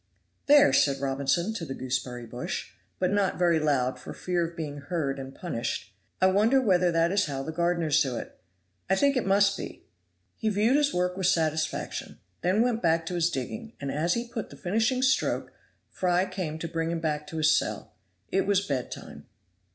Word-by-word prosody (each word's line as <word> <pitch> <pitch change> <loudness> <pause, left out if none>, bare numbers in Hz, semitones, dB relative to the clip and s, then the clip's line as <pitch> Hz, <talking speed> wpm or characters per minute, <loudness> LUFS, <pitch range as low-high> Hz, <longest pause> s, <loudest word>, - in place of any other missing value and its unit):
"There," 290 0 +7
said 140 -1 +3
Robinson, 140 +8 0
to 200 - -5
the 135 -4 -5
gooseberry 125 -1 -3
bush, 120 +2 -5 0.3
but 185 0 +1
not 200 -2 +1
very 170 -2 +3
loud 130 -4 +1
for - - -9
fear 180 -1 -1
of 170 +1 -13
being 145 -3 -4
heard 140 -3 -2
and 135 0 -8
punished, 115 - -4 0.3
"I - - +4
wonder 210 +8 +4
whether 180 -7 +3
that 165 +1 +2
is 205 -1 +2
how 135 -2 -3
the 160 - -4
gardeners 170 -2 +2
do 130 -3 0
it. - - -8 0.5
I 190 - +4
think 280 +7 +3
it 255 - 0
must 200 0 +4
be." - - -8 0.5
He 220 - 0
viewed 215 +6 +3
his 295 -1 +2
work 180 0 0
with 190 -1 0
satisfaction, 160 -4 -1 0.2
then 190 +6 +3
went 240 -2 0
back 165 0 +2
to 180 - -4
his 170 -1 +2
digging, 220 - -5
and 140 -1 -3
as 165 +4 +1
he 235 0 -3
put 230 -2 -5
the - - -12
finishing 225 +7 +1
stroke 265 0 +1 0.4
Fry 180 0 +1
came 185 -5 -4
to 165 - -4
bring 165 0 -2
him 170 0 -1
back 150 -2 -2
to 160 - -6
his 155 -1 +4
cell. - - -2 0.4
It 195 - +1
was 200 -1 +2
bedtime. 130 -6 -5
170 Hz, 195 wpm, -27 LUFS, 150-200 Hz, 0.5 s, There